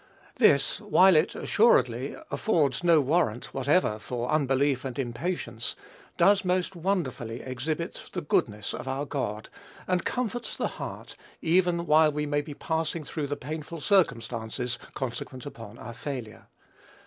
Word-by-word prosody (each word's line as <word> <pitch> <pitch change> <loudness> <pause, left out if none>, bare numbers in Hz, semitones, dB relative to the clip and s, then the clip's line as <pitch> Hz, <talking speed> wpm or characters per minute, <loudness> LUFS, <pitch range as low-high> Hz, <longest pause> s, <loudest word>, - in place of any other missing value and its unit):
This, 150 - +4
while 190 -3 +6
it, 155 +3 +3
assuredly, 130 - +3 0.2
affords 155 - +1
no 170 -2 +6
warrant 135 -5 0
whatever 135 -4 +2
for 120 +3 -3
unbelief 140 -2 +2
and 130 -3 -5
impatience, 120 -2 -3 0.4
does 200 0 +5
most 185 0 0
wonderfully 160 - -2
exhibit 150 +7 -4
the 180 - -2
goodness 105 -8 0
of - - -6
our 135 +2 -2
God, 110 -7 -3 0.4
and 180 -1 +1
comfort 245 -1 -2
the - - 0
heart - - -7 0.3
even 175 0 +3
while 155 -1 +5
we 150 0 -2
may 145 0 +1
be 145 -1 -8
passing 160 +1 -2
through 150 0 -4
the 145 - -3
painful 155 +4 -6
circumstances 125 - 0 0.2
consequent 130 0 -5
upon 115 -7 -9
our 115 - -8
failure. 125 -3 -6
145 Hz, 135 wpm, -28 LUFS, 125-170 Hz, 0.4 s, while